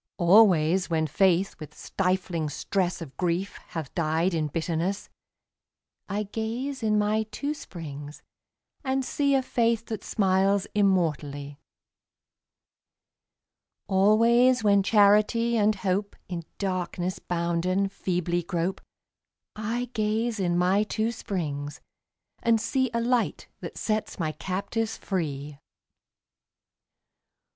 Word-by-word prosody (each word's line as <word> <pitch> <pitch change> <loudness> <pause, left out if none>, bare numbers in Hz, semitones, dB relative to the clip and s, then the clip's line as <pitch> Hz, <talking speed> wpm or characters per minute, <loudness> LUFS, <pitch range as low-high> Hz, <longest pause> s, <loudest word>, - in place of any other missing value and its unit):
Always 185 -2 +5
when 160 -1 +1
Faith 185 +4 +2
with 155 - -10
stifling 180 -4 -1
stress 180 +3 -1
Of 140 -4 -12
grief 180 +2 -1
hath 160 -5 -6
died 165 +2 +1
in 155 -2 0
bitterness, 165 +5 -2 1.0
I 205 +2 -1
gaze 230 +6 -4
in 215 -1 +2
my 210 +1 +1
two 290 +5 -3
springs 150 - -9 0.6
and 265 -1 0
see 280 0 +1
A 265 - +2
Faith 230 -2 +1
that 220 - -5
smiles 195 -1 +2
immortally. 150 -8 0 2.3
Always 230 +6 +4
when 200 -1 +5
Charity 215 +3 +4
and 215 -1 +3
Hope, 195 +1 -1
In 170 -3 -5
darkness 185 -1 -2
bounden, 175 +3 0
feebly 175 -2 -1
grope, 175 +2 -2 0.7
I 230 +3 -3
gaze 220 +1 0
in 175 -2 +1
my 185 +3 +3
two 220 +1 -1
springs 150 -10 -4 0.6
and 230 -1 +3
see 260 +3 0
A 235 - +1
Light 245 0 0
that - - -8
sets 215 -1 -2
my 160 -4 -1
captives 200 +7 -3
free. 145 -6 -4
195 Hz, 110 wpm, -27 LUFS, 170-220 Hz, 2.3 s, Always